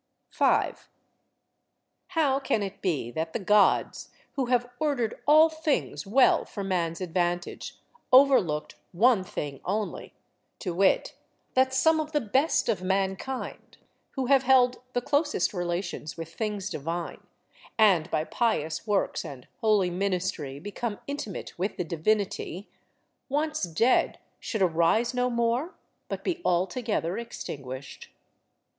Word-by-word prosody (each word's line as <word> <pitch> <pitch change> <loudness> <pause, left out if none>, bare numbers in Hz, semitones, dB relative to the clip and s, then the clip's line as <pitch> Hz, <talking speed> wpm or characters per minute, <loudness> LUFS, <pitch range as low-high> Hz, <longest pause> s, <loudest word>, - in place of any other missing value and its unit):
5. - - +1 1.2
How 305 -7 +1
can 270 -6 0
it 195 0 -6
be 150 - -1
that 160 +4 -3
the - - -1
Gods, 210 +1 +2 0.2
who 265 -3 -2
have 245 -1 +2
ordered 275 -8 -1
all 310 +2 +8
things 315 -9 -2
well 255 +6 +4
for 200 - -7
man's 175 -3 -1
advantage, 175 0 -2 0.3
overlooked 255 - +4 0.2
one 220 +2 +4
thing 145 -6 -5
only, 210 +3 -3 0.4
to 180 -5 -4
wit 190 +2 +2 0.4
that 260 0 +3
some 315 +5 +3
of 310 0 -4
the 295 - +3
best 265 +7 +1
of 215 -6 0
mankind, 190 +7 -3 0.4
who 265 -2 -2
have 270 +1 +5
held 255 -1 +4
the 245 - -1
closest 290 - +1
relations 175 -3 -3
with 165 0 -7
things 210 -1 -3
divine, 165 +4 -4 0.6
and 190 -7 +4
by 155 -2 0
pious 160 -4 -1
works 205 -2 0
and 130 -3 -9
holy 210 -5 +2
ministry 180 -7 -2
become 205 +4 -4
intimate 280 - -6
with 195 +4 -2
the - - -1
Divinity, 190 +2 -1 0.6
once 305 +2 -1
dead, 200 +10 +2 0.2
should 220 -4 -1
arise 180 +8 +2
no 250 0 +1
more, 235 +7 0 0.3
but - - -4
be 355 -1 -2
altogether 185 +1 0
extinguished? 140 - -7
205 Hz, 125 wpm, -27 LUFS, 175-255 Hz, 1.2 s, all